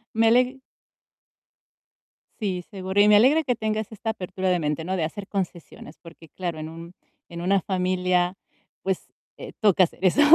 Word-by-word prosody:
Me 225 0 +4
aleg 250 +3 +3 1.8
Sí, 185 -4 -2
seguro, 190 -1 0
y 205 - +6
me 210 - +7
alegra 270 +9 +5
que 250 -4 0
tengas 220 -1 -2
esta 220 +1 -3
apertura 185 -2 -3
de 180 - +2
mente, 150 0 -2
¿no? 185 +3 -2
De 170 - -1
hacer 195 +5 -5
concesiones, 175 -5 -5
porque, 165 -1 -14
claro, 175 -4 -4
en 155 +1 -5
un 165 +2 -10 0.4
en 170 0 -7
una 195 +2 +3
familia, 180 0 0 0.5
pues, 190 -1 -3 0.3
eh, - - -9
toca 200 -4 +5
hacer - - -12
eso. 185 +11 +4
185 Hz, 170 wpm, -25 LUFS, 175-215 Hz, 1.8 s, me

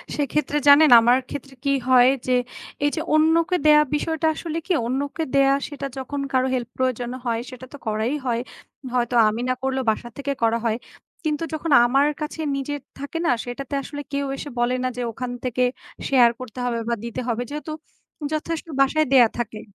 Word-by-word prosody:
সেক্ষেত্রে 295 0 -1
জানেন, 295 +2 +8
আমার 240 +2 +4
ক্ষেত্রে 275 -1 -7
কি 275 - +3
হয় 255 0 +6 0.2
যে, 255 - +3 0.5
এই - - +4
যে 320 - -2
অন্যকে 330 +3 +3
দেয়া 300 0 +7
বিষয়টা 320 +1 -1
আসলে 330 -1 -4
কি, 375 - +1
অন্যকে 280 +5 -2
দেওয়া 275 0 +5
সেটা 280 -1 -5
যখন 275 +2 -4
কারো 260 0 +2
help 245 -2 -2
প্রয়োজন 255 -2 -1 0.2
হয় 230 -1 0
সেটা 255 0 -10
তো - - -7
করাই 220 +6 0
হয়। 235 -1 0 0.5
হয়তো 245 0 0
আমি 225 +3 -3
না - - +3
করলেও 265 -1 -1
বাসা 240 +2 -5
থেকে 280 0 -3
করা 230 0 +3
হয়। 225 0 +1 0.5
কিন্তু 300 +1 -1
যখন 315 0 -3
আমার 275 +4 +3
কাছে 305 +1 -4
নিজের 285 +1 -3 0.2
থাকে 285 +4 -5
না - - +4
সেটাতে 265 +3 -7
আসলে 290 +1 -6
কেউ 280 0 0
এসে 290 - -6
বলে 245 +1 +2
না 255 - +1
যে - - -2
ওখান 250 +2 -5
থেকে 250 0 0 0.4
শেয়ার 250 -3 +6
করতে 255 -1 -8
হবে 235 -1 -1
বা 235 - +1
দিতে 235 +2 -4
হবে, 240 +1 -1
যেহেতু 300 +1 -6 0.6
যথেষ্ট 325 +2 -3
বাসায় 310 +3 +3
দেয়া 240 -4 +7
থাকে। 215 -2 -4
265 Hz, 185 wpm, -23 LUFS, 245-295 Hz, 0.6 s, জানেন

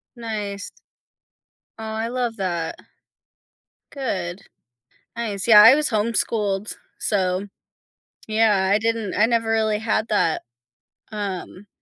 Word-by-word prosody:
Nice. 210 -4 -5 1.1
Oh, 225 - -8
I 220 +1 -3
love 240 -2 -2
that. 175 -4 -2 1.2
Good. 200 -9 -4 0.7
Nice. 220 -3 -3
Yeah, 210 -2 +9
I 230 +5 +9
was 300 0 +1
homeschooled. 210 -2 0 0.2
So, 190 -1 0 0.8
yeah, 215 -3 +2
I 205 - +4
didn't 225 -2 -1
I 215 - +4
never 230 -1 0
really 220 -1 +1
had 220 0 -1
that. 200 -6 +1 0.7
Um, 200 -1 -6
215 Hz, 105 wpm, -22 LUFS, 200-225 Hz, 1.2 s, Yeah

